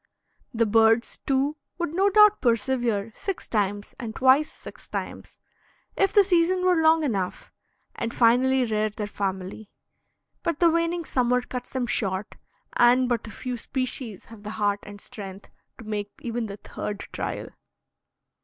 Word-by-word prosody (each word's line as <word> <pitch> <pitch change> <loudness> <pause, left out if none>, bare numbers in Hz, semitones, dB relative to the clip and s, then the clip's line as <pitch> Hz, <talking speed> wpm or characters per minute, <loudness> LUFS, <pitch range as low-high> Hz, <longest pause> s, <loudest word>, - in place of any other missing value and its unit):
The 230 0 +2
birds, 225 +2 +3
too, 275 +3 +1 0.2
would 345 -3 -2
no 385 +3 +3
doubt 420 +1 +6
persevere 230 -3 +1
six 390 -2 -5
times 205 -1 -1
and 225 -3 -5
twice 265 +4 +4
six - - -13
times, - - -6 0.6
if 390 - +2
the 410 - +6
season 365 0 +2
were 360 -3 +4
long 320 0 +5
enough, 195 -10 -2 0.4
and 230 - -3
finally 250 +3 +4
rear 215 -1 0
their 210 0 -5
family, 195 +1 -4 0.7
but 335 -3 -2
the 340 -2 +5
waning 335 +1 0
summer 250 -2 +1
cuts 250 0 -6
them 260 -2 -2
short, 195 -3 -2 0.4
and 250 +1 +5
but 235 -2 -1
a - - -8
few 250 +1 -5
species 255 -4 -4
have 225 -2 -13
the 210 - -7
heart 205 -1 +1
and 205 0 -11
strength 200 -4 -10 0.3
to - - -11
make 210 -1 -3
even 235 -1 -2
the 200 0 -7
third 205 0 -6
trial. - - -4
240 Hz, 155 wpm, -25 LUFS, 210-295 Hz, 0.7 s, doubt